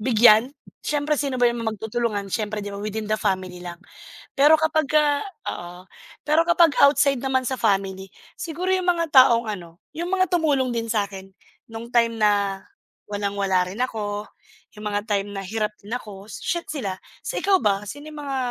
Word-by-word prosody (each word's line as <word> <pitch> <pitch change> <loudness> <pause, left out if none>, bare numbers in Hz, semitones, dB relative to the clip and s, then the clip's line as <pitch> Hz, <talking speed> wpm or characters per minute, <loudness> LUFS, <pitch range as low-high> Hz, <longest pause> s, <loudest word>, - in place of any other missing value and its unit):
bigyan. 230 +1 +5 0.3
Siyempre 295 0 0
sino 280 -2 -1
ba 245 -1 +4
yung 235 -1 -4
magtutulungan 220 -2 -2
siyempre 210 0 -2
di 205 - -5
ba 200 - -6
within 215 +1 -4
the 215 - +3
family 185 -3 -2
lang. 175 0 -8 0.6
Pero 295 +3 +7
kapagka 305 -2 +2 0.3
oo, 175 +1 -8 0.4
pero 310 +3 +3
kapag 340 -2 +5 0.2
outside 280 -1 +3
naman 265 0 0
sa 260 +1 -2
family, 195 -3 0 0.3
siguro 345 +3 -4
yung 370 -1 +1
mga 335 -2 +1
taong 240 -3 +6
ano, 175 -4 -8 0.2
yung 340 +1 -2
mga 375 -1 +2
tumulong 295 -7 +2
din 230 -1 -2
sa'kin, 200 -3 -3 0.4
nung 230 +1 -7
time 235 -1 +3
na 200 -2 +2 0.5
walang-wala 200 -2 0
rin 195 +5 -8
ako, 210 -4 -2 0.5
yung 210 - -8
mga 205 0 -1
time 200 -1 0
na 195 - -3
hirap 210 +2 -2
din 210 - -11
ako, 205 -4 -8
shi 345 - -2
sila. 220 -11 -3 0.3
Sa - - -2
ikaw 390 -1 +4
ba 205 -4 +1
sino 290 +8 -8
yung 300 - -9
mga, 275 -1 -3
225 Hz, 170 wpm, -23 LUFS, 200-285 Hz, 0.6 s, Pero